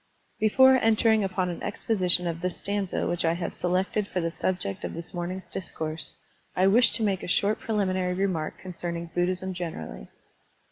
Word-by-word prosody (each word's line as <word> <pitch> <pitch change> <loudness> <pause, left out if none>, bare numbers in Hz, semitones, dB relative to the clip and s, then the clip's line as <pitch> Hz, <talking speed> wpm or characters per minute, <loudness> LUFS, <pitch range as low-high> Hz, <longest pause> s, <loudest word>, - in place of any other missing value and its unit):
BEFORE 260 +5 +6
entering 220 -2 +3
upon 185 -1 -1
an 175 - -5
exposition 180 -5 +2
of 170 -1 -3
this 180 0 -2
stanza 200 -2 -2
which 175 0 -1
I 165 0 +3
have 170 0 -4
selected 190 +3 0
for 185 - -2
the 165 -1 -1
subject 165 - -2
of - - -4
this 170 +1 -7
morning's 180 +2 -4
discourse, 160 -5 -5 0.4
I 185 - +3
wish 225 +4 +5
to 230 - -1
make 195 -3 +1
a - - -6
short 200 +4 +2
preliminary 185 -4 0
remark 180 -5 -1
concerning 170 -2 -5
Buddhism 185 +1 -1
generally. 80 - -6
185 Hz, 170 wpm, -27 LUFS, 170-200 Hz, 0.4 s, BEFORE